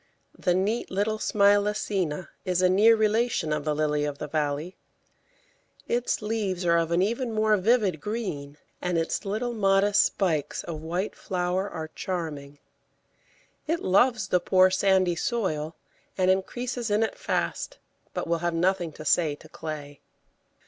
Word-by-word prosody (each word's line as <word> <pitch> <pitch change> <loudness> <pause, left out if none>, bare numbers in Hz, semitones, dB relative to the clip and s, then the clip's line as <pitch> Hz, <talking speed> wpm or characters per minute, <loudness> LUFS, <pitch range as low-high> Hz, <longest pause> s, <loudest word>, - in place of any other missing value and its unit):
The 180 -2 +1
neat 205 +6 0
little 210 +3 -1
Smilacina 200 -5 +1
is 185 -1 0
a 185 - +5
near 215 +4 +6
relation 220 -6 +1
of 150 -1 -2
the 150 -1 0
Lily 150 -1 0
of 145 -1 -3
the 150 - -5
Valley; 150 +3 -2 1.1
its 240 -2 0
leaves 205 -5 -2
are 170 0 +4
of 165 -1 -1
an 170 +2 +2
even 235 +4 -1
more 215 -1 +3
vivid 205 -5 +2
green, 155 -10 -4 0.2
and 180 -1 0
its 165 +6 -1
little 220 +5 -2
modest 200 -1 +4
spikes 160 -7 -1
of 160 -3 -6
white 175 +5 -3
flower 185 +1 -2
are 160 -3 -6
charming. 150 -6 -5 1.1
It 330 +2 0
loves 220 +4 +3
the 180 - +3
poor, 185 +1 +4
sandy 190 -2 +3
soil, 165 -7 -2 0.4
and 185 -1 +4
increases 240 +5 -2
in 210 +2 +2
it 225 - -2
fast, - - -2 0.3
but - - -3
will 170 0 0
have 175 0 -1
nothing 175 -1 +1
to 155 - -10
say 155 -1 +2
to 155 - -16
clay. 150 -3 -7
185 Hz, 150 wpm, -26 LUFS, 160-210 Hz, 1.1 s, near